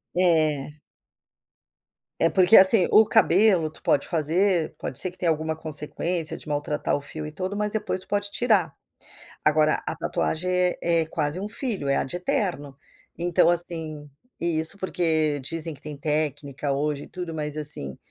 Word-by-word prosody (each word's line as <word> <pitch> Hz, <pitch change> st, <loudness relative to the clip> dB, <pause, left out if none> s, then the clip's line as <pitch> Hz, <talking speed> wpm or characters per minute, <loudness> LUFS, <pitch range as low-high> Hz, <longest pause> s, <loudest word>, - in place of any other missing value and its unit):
É. 155 Hz, -5 st, +1 dB, 1.4 s
É 165 Hz, -, +4 dB
porque 185 Hz, +3 st, +5 dB
assim, 190 Hz, 0 st, +7 dB
o 220 Hz, -, +6 dB
cabelo, 185 Hz, -4 st, +3 dB
tu -, -, -19 dB
pode 140 Hz, -, +1 dB
fazer, 170 Hz, +1 st, 0 dB
pode 130 Hz, -, -1 dB
ser 185 Hz, -, +3 dB
que 180 Hz, -, -14 dB
tenha 175 Hz, -, 0 dB
alguma 160 Hz, 0 st, -3 dB
consequência 160 Hz, +2 st, 0 dB
de -, -, -11 dB
maltratar 145 Hz, 0 st, -2 dB
o -, -, -6 dB
fio 155 Hz, +2 st, -6 dB
e 150 Hz, -, -7 dB
tudo. 185 Hz, +5 st, -5 dB
Mas 210 Hz, 0 st, -2 dB
depois 210 Hz, -3 st, -3 dB
tu -, -, -16 dB
pode 205 Hz, 0 st, -2 dB
tirar, 200 Hz, -, 0 dB, 0.7 s
agora 155 Hz, 0 st, +2 dB
a -, -, -3 dB
tatuagem 180 Hz, +3 st, -3 dB, 0.3 s
é 170 Hz, -1 st, +1 dB
quase 160 Hz, +2 st, -3 dB
um 205 Hz, -, -5 dB
filho, 210 Hz, -, -1 dB
é 140 Hz, -, +1 dB
ad 135 Hz, -, -4 dB
eternum. 175 Hz, -5 st, -3 dB, 0.5 s
Então 175 Hz, 0 st, +2 dB
assim, 160 Hz, -4 st, -1 dB, 0.3 s
isso, 165 Hz, +2 st, +3 dB
porque 160 Hz, -6 st, -1 dB
dizem 165 Hz, +3 st, 0 dB
que 140 Hz, -, -15 dB
tem 150 Hz, -1 st, -8 dB
técnica 145 Hz, -1 st, -3 dB
hoje 145 Hz, +1 st, -2 dB
e -, -, -13 dB
tudo 175 Hz, -2 st, -7 dB
mas 150 Hz, -1 st, -5 dB
assim 140 Hz, -, +3 dB
160 Hz, 160 wpm, -24 LUFS, 150-180 Hz, 1.4 s, assim